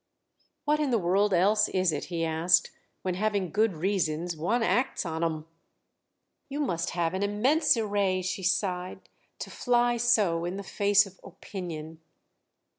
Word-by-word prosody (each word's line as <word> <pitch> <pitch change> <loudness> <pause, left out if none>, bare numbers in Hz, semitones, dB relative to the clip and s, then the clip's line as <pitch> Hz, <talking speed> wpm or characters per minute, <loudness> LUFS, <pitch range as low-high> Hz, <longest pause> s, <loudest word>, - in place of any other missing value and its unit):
"What 300 +1 +2
in 300 -2 0
the 240 - +2
world 195 +2 +2
else 205 +4 +3
is 185 -2 +1
it," 150 - -3
he 170 -2 -2
asked, 165 +2 +2 0.3
"when, 185 - -1
having 200 -2 -1
good 215 -1 +1
reasons, 170 -1 -1
one 215 +10 0
acts 245 -2 0
on 160 0 -3
'em?" 160 -2 -2 1.0
"You 280 +2 -4
must 175 - -1
have 170 0 0
an 190 - -2
immense 245 +9 +2
array," 200 -4 0
she 185 +1 -3
sighed, 180 0 -2 0.3
"to - - -7
fly 240 -1 +1
so 210 -8 +2
in 175 +2 -3
the 200 - -6
face 205 +1 +3
of 195 -1 -15
Opinion!" 165 -4 -8
190 Hz, 155 wpm, -28 LUFS, 170-215 Hz, 1.0 s, else